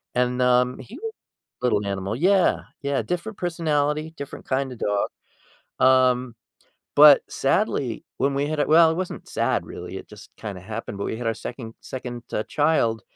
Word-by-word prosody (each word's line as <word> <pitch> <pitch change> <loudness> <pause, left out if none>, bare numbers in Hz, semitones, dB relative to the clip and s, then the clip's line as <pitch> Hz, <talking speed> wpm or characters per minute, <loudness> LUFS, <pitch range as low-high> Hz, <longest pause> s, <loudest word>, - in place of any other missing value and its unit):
and, 125 0 +1
um, 125 0 +3
he 125 - -10
was 450 0 -4 0.5
little 105 -5 +2
animal, 100 +2 -2
yeah, 185 +5 +3 0.2
yeah. 140 -1 0
Different 180 +5 -4
personality, 155 -2 0
different 140 -1 -8
kinda 130 -1 -1
dog. 105 -1 0 0.7
Um, 130 -2 +4 0.6
but 145 -1 +9
sadly, 135 - 0
when 140 +1 +2
we 140 +1 0
had 155 -1 -1
a - - +2
well, 160 +1 +7
it - - -4
wasn't 185 0 -5
sad, - - 0
really. - - -7
It - - -12
just - - -13
kinda 100 -4 -7
happened, 110 +1 -6
but 100 - -3
we 110 - -3
had 120 - -4
our 115 - 0
second 115 -1 -7
second, 125 -2 -7
uh, 105 - -1
child 145 -7 +2
130 Hz, 170 wpm, -24 LUFS, 115-155 Hz, 0.7 s, but